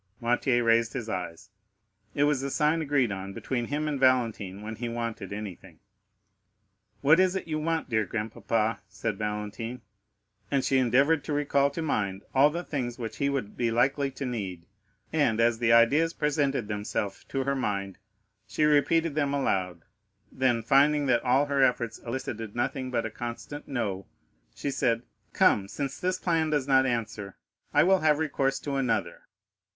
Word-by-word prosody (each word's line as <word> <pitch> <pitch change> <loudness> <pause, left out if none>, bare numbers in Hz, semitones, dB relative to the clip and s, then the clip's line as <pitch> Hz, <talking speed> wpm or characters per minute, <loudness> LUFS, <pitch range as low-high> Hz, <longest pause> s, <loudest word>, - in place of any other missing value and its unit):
Noirtier 120 +1 +1
raised 115 0 +3
his 115 - -4
eyes, 90 +1 -5 0.6
it 145 - +2
was 145 -2 +2
the 140 - -2
sign 150 +4 +1
agreed 140 -6 +1
on 95 0 -5
between 120 +3 -3
him 150 +4 -2
and 145 -2 -2
Valentine 115 -7 +1
when 110 0 -6
he 120 0 -3
wanted 115 -4 -4
anything. 95 -5 -7 1.2
"What 150 +5 +5
is 185 0 +3
it 190 - -3
you 155 -1 -2
want, 165 +1 -1
dear 110 -3 +1
grandpapa?" 110 +1 -1
said 105 -1 -4
Valentine, 105 +3 -4 0.7
and 135 -2 +1
she 135 - +3
endeavored 135 +5 +3
to 150 - -2
recall 140 -1 +2
to 160 +3 -5
mind 100 -9 -1
all 135 +2 +6
the 170 +3 -4
things 125 -7 -3
which 115 -3 -6
he 140 - +1
would 130 -7 -3
be 120 -1 0
likely 135 +4 +1
to 135 +1 -6
need; 95 -9 -4 0.5
and 140 -8 +2
as 115 -1 +3
the 120 -1 +2
ideas 145 +9 +5
presented 140 -5 0
themselves 105 -1 -3
to 135 -1 -2
her 140 +1 0
mind, 100 -6 -3 0.5
she 155 - -1
repeated 150 +2 +3
them 145 -1 0
aloud, 90 - -1 0.5
then,—finding 135 +4 +3
that 130 -3 +3
all 130 +3 +3
her 140 -1 0
efforts 120 -3 +1
elicited 115 -3 -5
nothing 130 +2 -2
but 120 -3 -1
a 115 - -4
constant 120 +6 -7
"No,"—she 100 - -6
said, 120 -3 0 0.3
"Come, 100 -1 +3
since 140 +6 -4
this 185 0 0
plan 165 -4 0
does 145 -3 0
not 130 -1 +4
answer, 110 -5 -3 0.4
I 150 - +5
will 190 +2 +4
have 155 -2 +3
recourse 135 -3 0
to 140 -1 -3
another." 115 -10 -1
125 Hz, 165 wpm, -27 LUFS, 110-145 Hz, 1.2 s, all